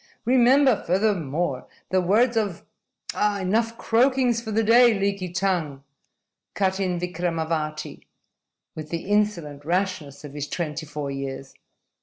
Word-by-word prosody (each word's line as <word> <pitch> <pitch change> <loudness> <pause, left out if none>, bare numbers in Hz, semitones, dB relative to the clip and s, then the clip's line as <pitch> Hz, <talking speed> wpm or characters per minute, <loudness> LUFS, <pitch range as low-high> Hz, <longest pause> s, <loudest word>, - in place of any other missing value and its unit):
Remember, 255 0 +4
furthermore, 175 -7 0 0.2
the 185 0 +2
words 225 +7 +3
of 205 -6 -2 0.3
" - - -9 0.2
"Enough 225 +5 0
croakings 245 0 +2
for 225 - -7
the 220 +1 +1
day, 235 0 +6
Leaky 195 -2 -1
Tongue!" 175 -7 -1 0.7
cut 190 -1 0
in 180 -3 -1
Vikramavati, 165 -3 -3 0.7
with 155 -1 -7
the 170 0 -4
insolent 190 -8 0
rashness 165 -5 -2
of 145 -2 -9
his 145 0 -4
twenty 160 -2 -4
four 145 -1 -5
years. 135 0 -6
185 Hz, 125 wpm, -24 LUFS, 155-220 Hz, 0.7 s, day